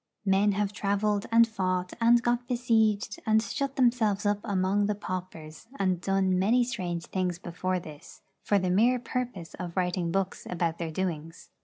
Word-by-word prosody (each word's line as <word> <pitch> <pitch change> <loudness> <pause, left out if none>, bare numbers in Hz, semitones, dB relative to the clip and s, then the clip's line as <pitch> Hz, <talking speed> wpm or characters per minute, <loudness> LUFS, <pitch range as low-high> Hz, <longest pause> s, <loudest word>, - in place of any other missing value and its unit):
Men 195 +1 +3
have 205 0 -1
travelled, 205 +1 0
and 230 0 +6
fought, 185 -4 -2
and 235 +1 +5
got 240 0 0
besieged, 220 -4 +1
and 220 0 +3
shut 275 +4 -3
themselves 230 -6 +2
up 205 0 +2
among 200 -1 +1
the 210 - 0
paupers, 185 -3 -7
and 185 -3 0
done 190 0 +1
many 230 +6 +3
strange 180 -9 -3
things 180 -2 -2
before 180 +1 -3
this, 150 -4 -12 0.2
for 205 - +2
the 185 -2 0
mere 235 +7 +4
purpose 240 -8 -4
of 180 0 -6
writing 180 -2 0
books 190 +1 -2
about 170 -2 -1
their 165 -1 -3
doings. 165 -1 -4
195 Hz, 165 wpm, -28 LUFS, 180-220 Hz, 0.2 s, and